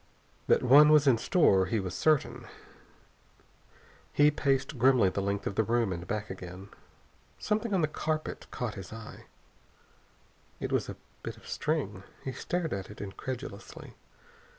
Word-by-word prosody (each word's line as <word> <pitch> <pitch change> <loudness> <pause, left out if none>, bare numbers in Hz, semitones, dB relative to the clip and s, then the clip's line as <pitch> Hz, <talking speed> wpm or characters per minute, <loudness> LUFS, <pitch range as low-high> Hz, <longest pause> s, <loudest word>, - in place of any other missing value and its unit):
That - - +4
one 145 +4 +8
was 150 -1 +6
in 125 -5 +4
store 100 - +3
he 110 +3 0
was 95 -2 -4
certain. 155 -3 +1 1.6
He 145 +1 +5
paced 135 -2 0
grimly 125 -5 +5
the 100 - -2
length 100 +1 -2
of - - -2
the 105 - +2
room 115 -3 +1
and 85 0 -7
back 105 +1 -3
again.... 95 +1 -9 0.7
Something 215 +2 -1
on 190 -3 +2
the 155 - +2
carpet 155 0 -3
caught 120 -3 -4
his 95 -2 -9
eye. 115 -1 -10 1.3
A - - -2
bit - - -5
of - - -16
string. - - -2 0.2
He 130 - -3
stared 175 +5 -2
at 95 -1 -5
it 105 - -11
incredulously. 105 +2 -7
120 Hz, 145 wpm, -30 LUFS, 100-150 Hz, 1.6 s, one